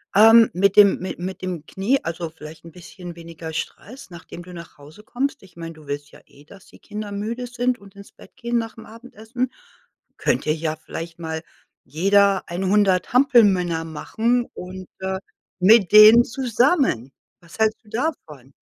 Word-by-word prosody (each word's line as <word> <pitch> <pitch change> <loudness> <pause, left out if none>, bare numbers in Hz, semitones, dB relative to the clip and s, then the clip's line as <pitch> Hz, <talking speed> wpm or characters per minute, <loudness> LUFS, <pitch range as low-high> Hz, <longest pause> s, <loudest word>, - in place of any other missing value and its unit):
ähm, 225 +2 +7
mit 195 +2 +2
dem 205 -1 +6
mit 185 -1 -6
mit 185 +1 -6
dem 175 -4 -5
Knie 230 +9 0
also, 165 0 -5
vielleicht 155 +1 -13
'n 165 - -11
bisschen 180 0 -11
weniger 165 -1 -9
Stress, 250 - -7
nachdem 170 0 -11
du 180 +1 -12
nach 170 -5 -12
Hause 150 +8 -15
kommst. 255 +1 -3
Ich 185 - -19
meine, 165 -1 -8
du 155 -1 -17
willst 145 +1 -6
ja - - -17
eh, 145 - -20
dass 190 +5 -17
die - - -19
Kinder 210 -1 -7
müde 220 +5 -4
sind 245 +1 -1
und 200 0 -18
ins 200 0 -14
Bett - - -18
gehen 240 -1 -2
nach'm 225 -1 -6
Abendessen. 235 +2 -6 0.7
Könnt - - 0
ihr 155 - +2
ja 155 -1 -3
vielleicht 165 +1 -8
mal 160 -1 -5 0.4
jeder 195 +6 +2
100 190 +2 +1
Hampelmänner 200 -11 +3
machen 230 +9 -1
und, 185 0 -9
äh, 190 0 -3 0.4
mit 195 0 +5
denen 215 +3 +9
zusammen. 250 - 0 0.3
Was 170 +4 -16
hältst 220 +1 +1
du - - -19
davon? 160 - -5
190 Hz, 170 wpm, -22 LUFS, 165-225 Hz, 0.7 s, denen